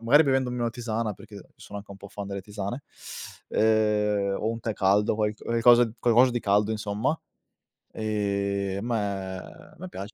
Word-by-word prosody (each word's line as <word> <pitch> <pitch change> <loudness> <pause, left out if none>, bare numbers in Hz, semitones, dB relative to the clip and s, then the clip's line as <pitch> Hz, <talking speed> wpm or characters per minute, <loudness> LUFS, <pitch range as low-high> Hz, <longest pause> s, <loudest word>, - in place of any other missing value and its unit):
magari 130 +7 +6
bevendomi 130 -3 +1
una 120 -1 +1
tisana 115 -2 -2
perché 100 0 -12
sono 100 - -8
anche 100 0 -12
un 100 - -8
po' 100 +1 -11
fan 100 0 -7
delle 100 0 -4
tisane, 105 +6 -5 0.7
ehm, 105 -2 +2
o 110 - -1
un 115 0 -3
tè 115 -1 -2
caldo, 105 +2 +2
qualc 105 0 -1
qualcosa 120 0 +5
qualcosa 120 +2 +5
di 120 - 0
caldo 105 +1 +2
insomma. 110 +7 -1 0.7
Ehm, 100 -2 -1
a - - -5
me 95 -3 -2
a - - -13
me 185 +3 -8
piace 100 - -7
105 Hz, 170 wpm, -27 LUFS, 100-115 Hz, 0.7 s, magari